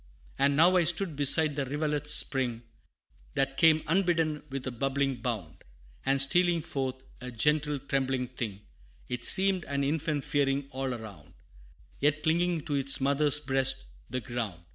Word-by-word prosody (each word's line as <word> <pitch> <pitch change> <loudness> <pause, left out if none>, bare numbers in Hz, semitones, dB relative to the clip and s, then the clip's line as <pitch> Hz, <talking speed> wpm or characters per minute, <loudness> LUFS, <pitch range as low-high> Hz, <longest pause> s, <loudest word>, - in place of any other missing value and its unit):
And 140 +1 +2
now 175 +5 +5
I 175 - +3
stood 170 0 0
beside 145 +2 +4
that 140 -2 -2
rivulet's 150 +1 +1
spring, 125 -4 +1 0.7
That 135 0 -1
came 160 0 +4
unbidden 165 -3 0
with 135 -1 -5
a 130 - -3
bubbling 135 +2 -1
bound 110 -10 -5 0.4
And 135 0 +1
stealing 175 +4 +3
forth, 135 -5 -3 0.3
a 125 - -7
gentle 150 +5 0
trembling 135 -2 -2
thing, 105 -4 -6 0.5
It 125 -1 -4
seemed 190 -2 +5
an 140 0 -2
infant 150 0 -1
fearing 140 -1 0
all 130 -1 -3
around 100 -10 -12 0.6
Yet 145 +1 0
clinging 170 0 0
to 150 - -4
its 140 -1 +3
mother's 140 +2 +2
breast 135 - -1 0.2
the 130 +1 -3
ground. 115 -9 -5
140 Hz, 150 wpm, -28 LUFS, 130-155 Hz, 0.7 s, now